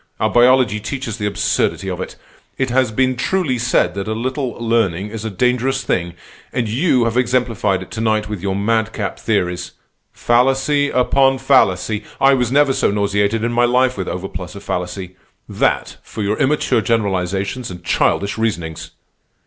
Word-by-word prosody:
Our -, -, +1 dB
biology 120 Hz, -3 st, +4 dB
teaches 115 Hz, +1 st, -5 dB
the 105 Hz, -, -1 dB
absurdity 100 Hz, -1 st, 0 dB
of 90 Hz, -1 st, -3 dB
it. -, -, -6 dB, 0.4 s
It 130 Hz, -2 st, -1 dB
has 130 Hz, -2 st, +2 dB
been 130 Hz, +3 st, +1 dB
truly 135 Hz, -1 st, 0 dB
said 100 Hz, -6 st, +1 dB
that 100 Hz, +1 st, -4 dB
a 110 Hz, -, -1 dB
little 130 Hz, +2 st, -2 dB
learning 105 Hz, -5 st, 0 dB
is 110 Hz, -1 st, -6 dB
a -, -, -1 dB
dangerous 125 Hz, +6 st, 0 dB
thing, 85 Hz, -1 st, -1 dB, 0.4 s
and 120 Hz, -3 st, -1 dB
you 125 Hz, +2 st, +2 dB
have 115 Hz, +1 st, -1 dB
exemplified 115 Hz, -6 st, +1 dB
it -, -, -16 dB
to 110 Hz, -, -4 dB
night 110 Hz, -1 st, +1 dB
with 105 Hz, -4 st, -5 dB
your 95 Hz, 0 st, -1 dB
madcap 110 Hz, 0 st, -1 dB
theories. 90 Hz, -5 st, -1 dB, 0.4 s
Fallacy 135 Hz, +4 st, +2 dB
upon 135 Hz, +1 st, +3 dB
fallacy! 110 Hz, -5 st, +2 dB, 0.2 s
I 135 Hz, 0 st, +5 dB
was 125 Hz, -2 st, +1 dB
never 140 Hz, 0 st, +4 dB
so -, -, +1 dB
nauseated 100 Hz, +2 st, 0 dB
in 120 Hz, +1 st, -1 dB
my 120 Hz, +1 st, +3 dB
life 125 Hz, +1 st, +2 dB
with 95 Hz, -, -4 dB
overplus 90 Hz, 0 st, -6 dB
of 100 Hz, -, -9 dB
fallacy. 90 Hz, +1 st, -4 dB, 0.3 s
That -, -, -1 dB
for 110 Hz, -, -6 dB
your 105 Hz, +2 st, -1 dB
immature 135 Hz, -4 st, +2 dB
generalizations 100 Hz, +1 st, -1 dB
and 90 Hz, -1 st, -9 dB
childish 100 Hz, +4 st, +1 dB
reasonings!" 85 Hz, -8 st, -3 dB
115 Hz, 165 wpm, -18 LUFS, 100-125 Hz, 0.4 s, I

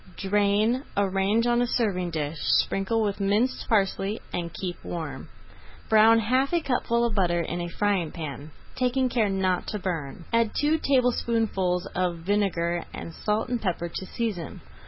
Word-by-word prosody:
Drain, 205 Hz, +5 st, +2 dB, 0.2 s
arrange 200 Hz, +3 st, +2 dB
on 240 Hz, 0 st, +3 dB
a 245 Hz, -, +1 dB
serving 195 Hz, -8 st, 0 dB
dish, 155 Hz, -1 st, -3 dB
sprinkle 195 Hz, -, +1 dB
with 205 Hz, -1 st, -1 dB
minced 205 Hz, +6 st, +1 dB
parsley, 200 Hz, 0 st, +1 dB
and 170 Hz, -1 st, -3 dB
keep 175 Hz, +2 st, -6 dB
warm. 170 Hz, -2 st, -6 dB, 0.6 s
Brown 220 Hz, +1 st, +7 dB
half 255 Hz, +5 st, +1 dB
a -, -, +4 dB
cupful 245 Hz, -5 st, 0 dB
of 235 Hz, -, -1 dB
butter 175 Hz, -4 st, +2 dB
in 170 Hz, +1 st, -3 dB
a 175 Hz, -, -3 dB
frying 190 Hz, -3 st, 0 dB
pan, 150 Hz, -2 st, -6 dB, 0.3 s
taking 255 Hz, +1 st, +1 dB
care 230 Hz, -4 st, +1 dB
not 190 Hz, -2 st, 0 dB
to 210 Hz, -, -2 dB
burn. 170 Hz, -4 st, -4 dB
Add 230 Hz, -2 st, +2 dB
two 300 Hz, +2 st, +2 dB
tablespoonfuls 225 Hz, -9 st, +1 dB
of 180 Hz, -2 st, 0 dB
vinegar 175 Hz, -2 st, 0 dB
and 165 Hz, -, -7 dB
salt 215 Hz, +6 st, -1 dB
and 245 Hz, -2 st, -1 dB
pepper 175 Hz, -3 st, -2 dB
to 190 Hz, -, -5 dB
season. 205 Hz, -9 st, -4 dB
200 Hz, 155 wpm, -26 LUFS, 175-230 Hz, 0.6 s, Brown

